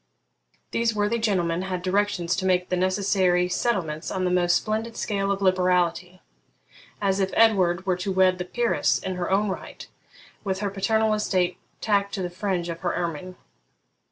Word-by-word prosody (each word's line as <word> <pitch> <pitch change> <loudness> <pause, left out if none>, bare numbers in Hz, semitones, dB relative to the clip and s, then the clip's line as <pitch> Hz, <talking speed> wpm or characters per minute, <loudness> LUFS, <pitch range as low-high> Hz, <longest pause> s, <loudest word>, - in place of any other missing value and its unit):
These 230 -1 0
worthy 210 +3 0
gentlemen 180 -6 0
had 185 -2 -4
directions 190 -2 0
to 190 - -2
make 180 -1 +1
the 180 - +1
necessary 185 -1 +2
settlements 175 -5 -1
on 185 -1 -2
the 180 - +1
most 175 -1 +3
splendid 220 +2 -2
scale 200 -2 -1
of 200 0 -2
liberality, 180 -1 +1 0.8
as 195 -1 0
if 190 -1 +1
Edward 190 -5 +3
were 185 -2 +1
to 185 +2 -3
wed 185 -1 +3
a - - -3
peeress 235 +5 +1
in 190 - -4
her 180 -1 -3
own 200 +2 +2
right, 190 - -7 0.6
with 190 -1 -2
her 200 -1 -1
paternal 220 +2 +1
estate 185 -4 0 0.2
tacked 200 -2 +1
to 190 - -3
the 175 - -4
fringe 180 -2 -2
of 170 -1 -5
her 175 -1 -2
ermine. 175 +1 -4
185 Hz, 170 wpm, -25 LUFS, 180-205 Hz, 0.8 s, most